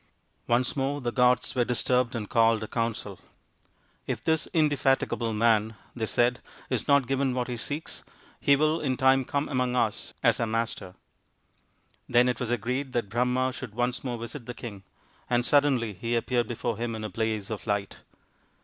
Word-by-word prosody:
Once 120 +1 +1
more 140 +1 -1
the 120 -3 -2
gods 125 -1 +3
were 125 - +2
disturbed 125 0 +1
and 105 -3 -3
called 115 0 +3
a - - -5
council. 115 0 -3 0.4
" - - -37
If - - -2
this 160 -1 +1
indefatigable 140 -7 +1
man," 110 0 +2 0.2
they 110 -2 -2
said, 120 +2 +1
" - - -22
is - - -1
not 140 -2 +4
given 135 0 0
what 125 -1 -1
he 125 - -3
seeks, 145 +8 -5 0.4
he 140 - +5
will 155 +3 +2
in 130 -4 0
time 130 0 +4
come 140 +3 -1
among 125 -2 0
us 115 -4 0
as - - +4
our 115 - 0
master." 110 -5 -3 1.1
Then 120 +1 +5
it 125 - 0
was 125 - -2
agreed 125 +3 -2
that 120 -5 -1
Brahma 125 +3 +1
should 125 -5 -8
once 120 +1 -1
more 125 -3 -3
visit 115 +2 -7
the 125 - -6
king, 105 -5 -8 0.5
and 120 0 +2
suddenly 135 -7 +3
he 115 +6 -2
appeared 120 0 0
before 120 -1 -3
him 115 0 -3
in 110 - -6
a - - -2
blaze 110 -2 -2
of 110 +1 -5
light. 100 -1 -1
120 Hz, 185 wpm, -27 LUFS, 115-130 Hz, 1.1 s, he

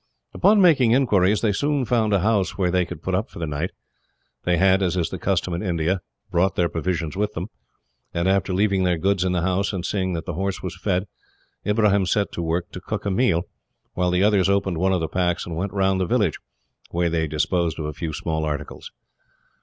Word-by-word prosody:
Upon 210 +1 +4
making 140 -11 +5
inquiries, 105 -6 +3
they 110 - +2
soon 140 +5 0
found 110 -3 +1
a 100 -3 +3
house 105 -2 +1
where 90 -3 +1
they 90 -1 +2
could 85 -2 -9
put 95 - -2
up 100 +7 0
for - - -13
the 85 - -2
night. 75 +4 -2 0.8
They 90 -1 +2
had, 95 +2 +4
as 90 -1 0
is 85 - -1
the - - -5
custom 90 - 0
in 85 - -2
India, 90 -1 0 0.3
brought 90 +2 +2
their 85 -1 +1
provisions 80 +1 -2
with 105 +2 -1
them, 90 +6 -5 0.6
and 85 +2 -1
after 95 0 +1
leaving 100 +1 +2
their 90 -2 +2
goods 95 +2 +1
in 95 - 0
the 90 -2 0
house, 95 +3 0
and 90 -2 -3
seeing 95 -2 -1
that 80 -1 -4
the 90 - -4
horse 95 +3 -3
was 90 -2 -4
fed, 95 0 -1 0.6
Ibrahim 105 -2 +3
set 100 +1 +1
to - - -4
work 85 +1 -2
to 90 - -8
cook 105 +2 -4
a 100 - 0
meal; 95 -5 +2 0.5
while 90 0 0
the 90 +2 +2
others 100 -3 +3
opened 100 -4 +1
one 95 +2 +2
of 90 -2 +1
the 80 - -1
packs, 90 +1 -1
and 85 - -5
went 95 +4 -2
round 95 -1 +1
the 90 - 0
village, 105 - +1 0.5
where 85 0 0
they 80 -1 0
disposed 80 +2 0
of 80 - -4
a 75 - -4
few 80 +2 -4
small 80 +1 -2
articles. 75 -2 -5
95 Hz, 225 wpm, -23 LUFS, 85-100 Hz, 0.8 s, making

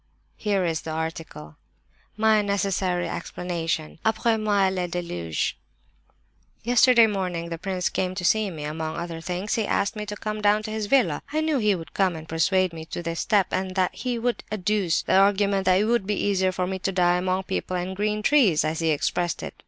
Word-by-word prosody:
Here 200 -4 0
is 165 -2 -1
the - - -7
article. 160 - -5 0.6
MY 220 -1 +4
NECESSARY 195 -3 0
EXPLANATION. 165 -3 -4
"Après 220 0 +1
moi 205 -2 +3
le 185 -1 -2
déluge. 90 - -3 1.1
"Yesterday 240 0 +6
morning 180 -5 -2
the 165 -1 -5
prince 185 -1 -2
came 185 0 -2
to 180 -2 -3
see 215 +2 +3
me. 155 -5 -7
Among 155 +1 -4
other 170 -1 -5
things 180 +4 -3
he 220 -3 0
asked 200 - 0
me 210 -1 -5
to 210 - -4
come 215 0 -4
down 210 +1 +3
to 215 - -5
his 215 -1 -3
villa. 265 +2 +2
I 310 +1 0
knew 310 -3 +1
he 210 -3 +3
would 165 -4 -9
come 190 -3 +1
and 160 0 -9
persuade 180 +3 +1
me 160 -1 -7
to 175 - -6
this 165 0 -3
step, 205 -4 +2
and 185 0 -2
that 185 -2 +1
he 245 0 -3
would 240 +1 -1
adduce 200 -3 0
the - - 0
argument 200 0 +3
that 185 0 +4
it 210 - +2
would 235 -3 +1
be 210 - +1
easier 190 -2 +1
for 185 0 -2
me 190 +1 -3
to 195 - -1
die 180 -1 +3
'among 185 +1 -1
people 185 -1 -3
and 180 +2 -4
green 210 +1 -1
trees,'—as 170 - +3
he 165 -1 +1
expressed 170 +3 -1
it. - - -6
190 Hz, 200 wpm, -25 LUFS, 170-210 Hz, 1.1 s, Yesterday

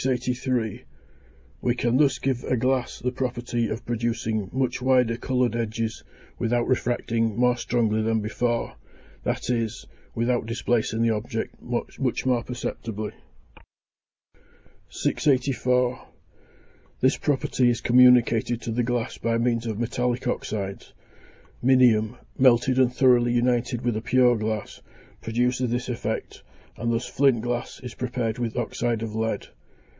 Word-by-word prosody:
We 120 - +1
can 120 0 +1
thus 135 -3 +3
give 125 0 -1
a 125 - +1
glass 130 +1 0
the 125 - -2
property 120 -2 -2
of 115 +2 -5
producing 115 -3 -2
much 130 -1 -1
wider 125 -2 +3
coloured 125 -1 0
edges 115 -1 -3 0.4
without 120 0 +1
refracting 115 -3 0
more 125 0 +3
strongly 115 -3 0
than 110 0 +1
before, 115 +2 -2 0.4
that - - -2
is, 115 -3 -2 0.3
without 120 0 0
displacing 115 -1 0
the 115 - +3
object 110 +1 -4
much 120 -1 -4 0.3
more 125 -2 +2
perceptibly. 110 -3 -5 1.8
684. 125 -2 +1 0.9
This 130 +1 +3
property 135 -3 +1
is 120 -1 0
communicated 120 -1 +5
to 115 - -3
the 120 +2 0
glass 120 -1 -2
by 115 0 0
means 115 0 0
of 110 -2 -3
metallic 120 +1 -1
oxydes. 100 -2 -4 0.7
Minium, 120 -3 +4 0.2
melted 130 0 +4
and 130 -2 +4
thoroughly 125 -2 +4
united 120 0 +1
with 120 -2 0
a 110 - -2
pure 125 +1 +4
glass, 110 -1 -3 0.4
produces 125 +2 0
this 125 +2 -2
effect, 110 -2 -4 0.3
and 115 0 -2
thus 115 +2 -1
flint 130 -5 +2
glass 120 +1 -3
(291) - - -14
is 125 - -6
prepared 125 -2 -3
with 115 -2 -2
oxyde 120 -1 -1
of 110 -2 -5
lead. 110 0 -2
120 Hz, 130 wpm, -25 LUFS, 115-125 Hz, 1.8 s, communicated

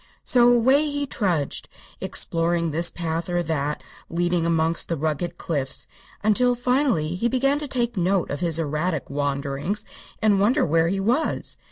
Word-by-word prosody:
So 245 -1 +5
away 260 +5 +4
he 285 0 -2
trudged, 180 - -1 0.3
exploring 170 0 0
this 170 +3 +3
path 165 0 -3
or 175 0 0
that 150 -3 -2 0.3
leading 175 0 0
amongst 165 0 +1
the 165 - -1
rugged 160 +3 -2
cliffs, 135 -5 -3 0.4
until 245 +4 +3
finally 245 - +1
he 230 +7 0
began 275 +3 +1
to 295 - -4
take 240 -3 -1
note 185 0 +1
of 140 - -3
his 165 -2 +1
erratic 155 0 -2
wanderings 145 +7 -2 0.3
and 210 -3 +3
wonder 235 +9 +3
where 165 +1 +2
he 195 +3 -1
was. 240 +10 0
175 Hz, 155 wpm, -23 LUFS, 160-235 Hz, 0.4 s, So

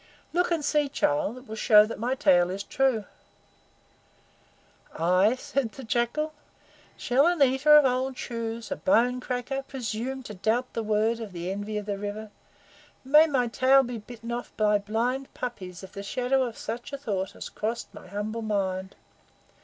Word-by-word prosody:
Look 355 +1 +2
and 325 -4 0
see, 295 -1 +2
child. 200 - 0
It 255 0 -13
will 220 - -6
show 215 -1 +6
that 225 - -7
my 245 +4 0
tale 180 -10 +4
is 195 +2 -4
true." 260 -5 +1 1.9
"I?" 185 +7 +3
said 255 -2 -2
the 270 - -9
Jackal. 240 +7 -1 0.6
"Shall 270 +6 +3
an 350 -1 +1
eater 270 +3 +5
of 295 - +6
old 260 0 0
shoes, 230 0 -5
a 280 - -2
bone 250 -2 +2
cracker, 250 +2 -3
presume, 260 0 -4
to 215 - -8
doubt 225 +6 -1
the 230 - -2
word 220 +2 +1
of 215 -4 -7
the 175 +1 -4
Envy 205 +2 -4
of 210 - -4
the 200 -1 -3
River? 210 +1 -5 0.7
May 300 +4 +7
my 265 -5 +1
tail 260 +3 +4
be 240 -2 -5
bitten 230 +2 -9
off 240 0 -4
by 210 -1 +3
blind 235 +6 -2
puppies 190 -7 -6
if 190 - -10
the 200 - -7
shadow 255 +6 0
of 235 -2 -6
such 235 +4 -6
a 280 - -4
thought 195 -8 -3
has - - -7
crossed 225 +2 -4
my - - -12
humble 215 +3 -4
mind! 190 -3 -2
235 Hz, 175 wpm, -27 LUFS, 210-265 Hz, 1.9 s, May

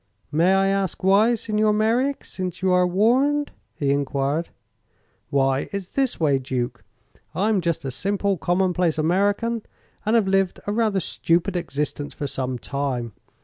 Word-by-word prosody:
"May 170 +5 +3
I 195 0 +3
ask 195 -2 -1
why, 205 +5 +4
Signor 215 -1 +1
Merreek 235 +6 +1
since 185 -1 -5
you 190 - +3
are 180 0 +4
warned?" 260 +10 +2 0.2
he 140 -2 0
enquired. 140 +3 -1 0.8
"Why, 135 -1 +1
it's 200 -2 -5
this 270 -3 0
way, 145 -4 +2
Duke. 125 -2 -3 0.5
I'm 205 0 +2
just 170 -4 -1
a 135 - -2
simple, 200 +6 0
common 180 +1 +1
place 170 -3 +1
American, 200 +8 +1 0.4
and 215 +2 +1
have 220 -4 +3
lived 195 -1 +1
a 205 - -1
rather 215 -3 +1
stupid 175 +2 0
existence 145 -3 -3
for 145 - -4
some 130 -2 -3
time. 130 -4 -3
185 Hz, 150 wpm, -23 LUFS, 145-210 Hz, 0.8 s, why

